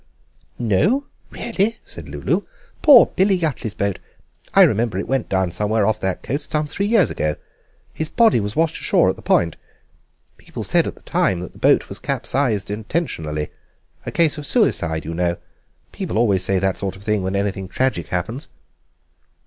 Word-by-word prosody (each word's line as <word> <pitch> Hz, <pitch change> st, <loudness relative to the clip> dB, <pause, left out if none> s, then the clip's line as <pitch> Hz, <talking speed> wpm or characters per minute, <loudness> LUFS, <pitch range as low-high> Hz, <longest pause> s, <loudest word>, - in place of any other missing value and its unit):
"No! 125 Hz, -, +1 dB, 0.2 s
really?" 225 Hz, -1 st, -1 dB
said -, -, -10 dB
Lulu; -, -, -1 dB, 0.4 s
"poor 280 Hz, -7 st, +9 dB
Billy 190 Hz, 0 st, +3 dB
Yuttley's 135 Hz, -, -3 dB
boat. 100 Hz, -2 st, -1 dB, 0.6 s
I -, -, +9 dB
remember 110 Hz, -2 st, +2 dB
it 100 Hz, -, -3 dB
went 135 Hz, -2 st, -1 dB
down 95 Hz, -2 st, 0 dB
somewhere 105 Hz, +2 st, 0 dB
off 110 Hz, +1 st, +1 dB
that 95 Hz, -2 st, -2 dB
coast 140 Hz, +5 st, -3 dB
some 150 Hz, 0 st, 0 dB
three 195 Hz, +7 st, -2 dB
years 220 Hz, -4 st, +3 dB
ago. 75 Hz, 0 st, -1 dB, 0.6 s
His 155 Hz, -1 st, -3 dB
body 225 Hz, -, +4 dB
was 105 Hz, 0 st, -4 dB
washed 165 Hz, -1 st, 0 dB
ashore -, -, +3 dB
at -, -, -8 dB
the -, -, -13 dB
Point. 85 Hz, -2 st, +1 dB, 0.8 s
People -, -, -8 dB
said -, -, +3 dB
at -, -, -5 dB
the -, -, -19 dB
time 90 Hz, -, +1 dB
that 90 Hz, -, -8 dB
the -, -, -16 dB
boat -, -, +3 dB
was -, -, -6 dB
capsized 110 Hz, -8 st, -1 dB
intentionally—a 105 Hz, -, -5 dB
case 160 Hz, -3 st, +2 dB
of 145 Hz, -, -5 dB
suicide, 85 Hz, -, +1 dB
you 80 Hz, -, -4 dB
know. 85 Hz, 0 st, 0 dB, 0.5 s
People -, -, -4 dB
always 100 Hz, -5 st, +2 dB
say 95 Hz, +1 st, +1 dB
that 95 Hz, 0 st, 0 dB
sort 95 Hz, -2 st, -3 dB
of 95 Hz, -, -14 dB
thing 105 Hz, -1 st, 0 dB
when 95 Hz, +1 st, -2 dB
anything 100 Hz, -1 st, -2 dB
tragic 130 Hz, -5 st, -1 dB
happens." 110 Hz, -, -3 dB
105 Hz, 175 wpm, -21 LUFS, 95-155 Hz, 0.8 s, poor